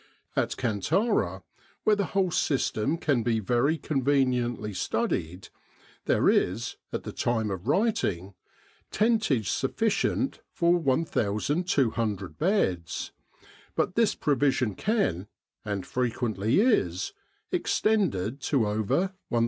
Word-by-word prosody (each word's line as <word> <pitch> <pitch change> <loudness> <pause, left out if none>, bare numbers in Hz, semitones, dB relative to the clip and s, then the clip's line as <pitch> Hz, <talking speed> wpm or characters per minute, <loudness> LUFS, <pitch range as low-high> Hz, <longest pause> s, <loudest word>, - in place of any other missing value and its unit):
At - - 0
Kantara, 125 - 0 0.4
where 215 - +4
the 200 -1 0
whole 185 -2 +2
system 140 -1 0
can 145 -7 +1
be 115 -1 +1
very 125 +9 +1
conveniently 130 -7 0
studied, 90 0 -2 0.6
there - - +2
is, 110 +6 +1 0.2
at - - -3
the - - -6
time 110 -3 -1
of 95 -1 -5
writing, 100 - 0 0.6
tentage 215 - +1
sufficient 225 - 0
for 170 0 +2
1,200 130 - 0
beds; 95 - 0 0.6
but - - 0
this 230 0 +2
provision 135 -5 +1
can, 105 - 0 0.4
and 100 -3 -3
frequently 115 - 0
is, 95 - +1 0.4
extended 145 - +1
to 135 -4 +1
over 110 - 0 0.2
1,500. 120 - +1
125 Hz, 105 wpm, -27 LUFS, 105-175 Hz, 0.6 s, where